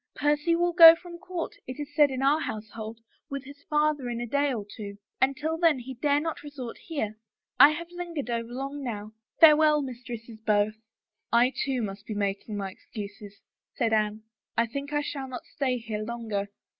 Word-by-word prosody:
Percy 295 +3 +2
will 345 +1 +1
go 330 -2 +11
from 345 0 -11
court, 360 -2 -5
it 255 +3 -7
is 295 0 -6
said 295 -1 +5
in 265 0 -3
our 285 +3 +4
household, 220 -2 -6 0.3
with 275 -1 -4
his 285 +1 -13
father 300 -4 +1
in 235 -1 -3
a 240 - -2
day 280 +4 +1
or 220 -5 -3
two, 200 -1 -8 0.2
and 265 +1 +3
till 320 +2 -2
then 330 -4 +4
he 255 +1 -7
dare 285 +3 +2
not 325 +1 -3
resort 285 -5 -8
here. 220 -10 -4 0.4
I 285 +3 +11
have 340 +3 -5
lingered 345 -5 -5
over 235 -1 -3
long 275 +3 -5
now. 215 -4 -5 0.3
Farewell, 305 -2 +7
mis 250 -2 -7
tresses 230 -2 -8
both." 215 -1 +2 0.3
" - - -58
I, 245 +3 +4
too, 265 -4 -1
must 200 0 -6
be 215 - -4
making 205 +1 -2
my 195 -1 -3
excuses," 205 0 -9 0.3
said 230 -2 +1
Anne. 215 0 +1 0.2
" - - -47
I 230 - +4
think 280 +5 -5
I 295 0 +1
shall 275 -2 -4
not 255 -1 -7
stay 260 -3 -1
here 220 -2 -4
longer." 215 -3 -3
255 Hz, 200 wpm, -27 LUFS, 220-295 Hz, 0.4 s, go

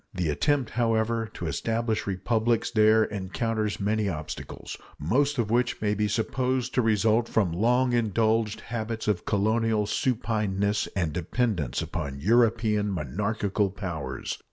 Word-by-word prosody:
The 90 -4 0
attempt, 130 - +1
however, 115 -1 0
to - - -5
establish 115 -1 -1
republics 110 +5 0
there 110 -1 +5
encounters 105 +2 -2
many 105 0 0
obstacles, 80 -3 -6 0.2
most 140 - +1
of 110 -3 0
which 120 +1 +1
may 105 -1 +1
be 105 +1 0
supposed 125 +4 -1
to 125 - +3
result 110 +1 +2
from 100 -6 +1
long 120 +7 +2
indulged 110 -1 +1
habits 115 -1 -4
of 105 -4 0
colonial 110 +1 +1
supineness 105 -3 0
and 85 -6 0
dependence 90 - -1
upon 70 0 -4
European 110 - +2
monarchical 100 - -1
powers. 80 -9 -5
110 Hz, 130 wpm, -27 LUFS, 100-115 Hz, 0.2 s, there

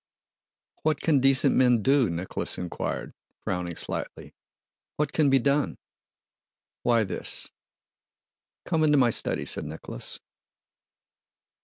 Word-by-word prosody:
"What 155 -2 +1
can 150 -4 +2
decent 135 0 +4
men 125 -4 +4
do?" 135 -3 +3
Nicholas 85 +2 -3
inquired, 90 -1 -4 0.3
frowning 90 -2 -3
slightly. - - -4 0.6
"What 150 -1 -1
can 150 -3 +3
be 135 - +5
done?" 140 +3 +1 1.0
"Why, 115 -2 +3
this..." 95 - -3 1.1
"Come 160 -2 +1
into 150 -1 +4
my 125 -3 +4
study," - - -1
said - - +1
Nicholas. - - -6
130 Hz, 110 wpm, -26 LUFS, 110-145 Hz, 1.1 s, be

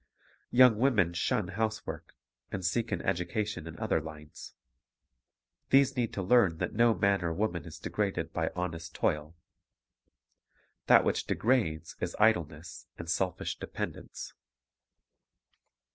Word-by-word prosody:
Young 125 -3 +6
women 110 -10 +3
shun 85 +1 0
housework, 110 +2 -4 0.4
and 95 -2 -4
seek 115 +5 0
an - - -2
education 90 0 -2
in 80 0 -8
other 80 - 0
lines. 75 -1 -10 1.1
These 135 0 +4
need 120 -3 0
to 95 - -3
learn 95 -5 +4
that - - -3
no 115 0 +4
man 100 -2 +2
or 85 - 0
woman 90 -1 -2
is 80 -1 -9
degraded 100 +3 -2
by - - 0
honest 85 -2 -4
toil. 75 +2 -1 1.5
That - - +7
which - - 0
degrades 95 -10 0
is - - -3
idleness 85 -7 +1
and 85 - -7
selfish 90 +1 -1
dependence. - - -6
90 Hz, 125 wpm, -30 LUFS, 80-110 Hz, 1.5 s, That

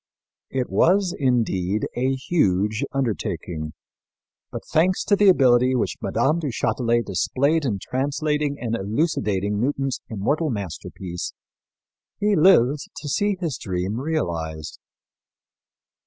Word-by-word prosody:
It 130 -2 -1
was, 185 0 +3
indeed, 110 -7 0
a 130 +2 +1
huge 105 - +1
undertaking; 90 - -3 0.8
but, - - -6
thanks 180 +4 +2
to 205 - +3
the 205 0 +5
ability 130 -5 +4
which 125 - -1
Mme. 135 +9 +1
du 155 - -3
Châtelet 120 -1 0
displayed 140 - +1
in 110 -6 0
translating 145 +4 -1
and 115 -1 -2
elucidating 105 - -1
Newton's 135 0 -1
immortal 145 +10 0
masterpiece, 95 - -5 0.9
he 210 0 +2
lived 150 -6 +5 0.2
to 150 - -7
see 205 +7 0
his 160 -9 -3
dream 95 +3 -2
realized. 85 - -3
125 Hz, 110 wpm, -23 LUFS, 100-150 Hz, 0.9 s, the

